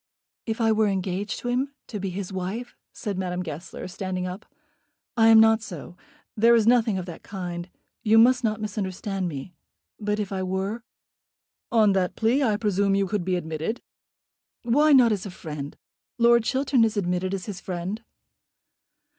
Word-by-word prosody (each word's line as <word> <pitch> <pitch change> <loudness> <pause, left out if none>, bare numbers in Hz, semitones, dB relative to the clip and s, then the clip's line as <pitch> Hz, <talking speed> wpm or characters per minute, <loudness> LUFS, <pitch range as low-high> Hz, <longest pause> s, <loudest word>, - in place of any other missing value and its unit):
"If 225 +1 -2
I 225 -1 +3
were 220 0 +3
engaged 195 +1 -2
to - - -5
him, 265 +3 -1
to 210 - -6
be 195 0 -3
his 190 +1 -5
wife? 195 +7 -4
" - - -61
said 200 -4 -4
Madame 180 -1 -2
Goesler, 160 +3 -7
standing 185 0 -4
up. 185 +3 -7 0.7
"I 225 -1 +5
am 225 0 +8
not 220 0 +5
so. 175 -5 -8 0.4
There 230 +2 +5
is 225 -2 +3
nothing 230 -4 +4
of 185 - -4
that 170 -3 -9
kind. 180 -2 -6 0.3
You 220 -1 +4
must 250 +2 +5
not 215 -1 0
misunderstand 195 -2 -3
me. 155 +2 -6 0.5
But 210 0 -1
if 205 -2 -3
I 190 -1 -2
were?" 190 +5 -2 0.9
"On 220 -3 +5
that 185 -2 0
plea 235 +5 +2
I 220 -6 +2
presume 200 -2 +1
you 195 0 +2
could 200 -1 -2
be 185 +1 0
admitted." 160 +6 -3 0.8
"Why 290 +6 +4
not 250 -5 +7
as 205 -1 -2
a - - -6
friend? 150 -5 -7 0.4
Lord 235 -1 +5
Chiltern 265 -1 +2
is 220 -2 +1
admitted 180 -1 0
as 185 - -6
his 195 -4 -6
friend." 185 +4 -4
205 Hz, 175 wpm, -25 LUFS, 185-225 Hz, 0.9 s, am